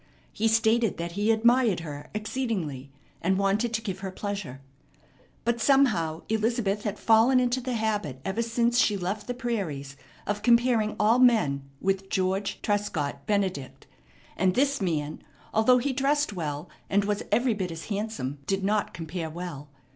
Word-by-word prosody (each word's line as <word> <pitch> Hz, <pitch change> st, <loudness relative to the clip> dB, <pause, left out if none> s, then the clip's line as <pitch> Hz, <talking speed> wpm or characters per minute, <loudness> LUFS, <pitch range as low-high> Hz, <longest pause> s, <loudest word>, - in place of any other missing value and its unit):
He 225 Hz, -, +1 dB
stated 225 Hz, -1 st, +2 dB
that 170 Hz, 0 st, -4 dB
he 205 Hz, +5 st, -1 dB
admired 230 Hz, -4 st, +3 dB
her 145 Hz, -3 st, -8 dB
exceedingly, 200 Hz, -, -3 dB, 0.3 s
and 190 Hz, +2 st, +1 dB
wanted 200 Hz, +4 st, +1 dB
to 225 Hz, -, -3 dB
give 190 Hz, -4 st, -4 dB
her 195 Hz, 0 st, -4 dB
pleasure. 195 Hz, -8 st, -5 dB, 0.9 s
But 235 Hz, 0 st, 0 dB
somehow 210 Hz, -, +3 dB
Elizabeth 220 Hz, -2 st, 0 dB
had 210 Hz, 0 st, -2 dB
fallen 230 Hz, +4 st, +5 dB
into 250 Hz, +1 st, +1 dB
the 250 Hz, 0 st, -3 dB
habit 210 Hz, -, -1 dB
ever 195 Hz, +4 st, -1 dB
since 235 Hz, +1 st, +1 dB
she 210 Hz, -4 st, +3 dB
left 195 Hz, +3 st, -3 dB
the 245 Hz, -, -3 dB
prairies 185 Hz, -, -3 dB, 0.3 s
of 205 Hz, 0 st, -2 dB
comparing 235 Hz, -2 st, +3 dB
all 220 Hz, +4 st, +4 dB
men 150 Hz, -, +3 dB
with 195 Hz, 0 st, -1 dB
George 190 Hz, +1 st, -1 dB
Trescott 160 Hz, -9 st, -2 dB
Benedict; 190 Hz, -10 st, -1 dB, 0.5 s
and 185 Hz, 0 st, +2 dB
this 275 Hz, -1 st, +2 dB
man, 155 Hz, -5 st, -2 dB, 0.3 s
although 220 Hz, +3 st, +5 dB
he 260 Hz, +2 st, 0 dB
dressed 280 Hz, -1 st, +1 dB
well, 155 Hz, -2 st, -4 dB, 0.2 s
and 200 Hz, 0 st, +2 dB
was 205 Hz, 0 st, -1 dB
every 240 Hz, 0 st, +3 dB
bit 190 Hz, -4 st, -3 dB
as 165 Hz, -1 st, -7 dB
handsome, 205 Hz, -10 st, -3 dB
did 195 Hz, 0 st, 0 dB
not 205 Hz, +1 st, 0 dB
compare 165 Hz, 0 st, -4 dB
well. 160 Hz, -4 st, -7 dB
205 Hz, 155 wpm, -27 LUFS, 175-230 Hz, 0.9 s, fallen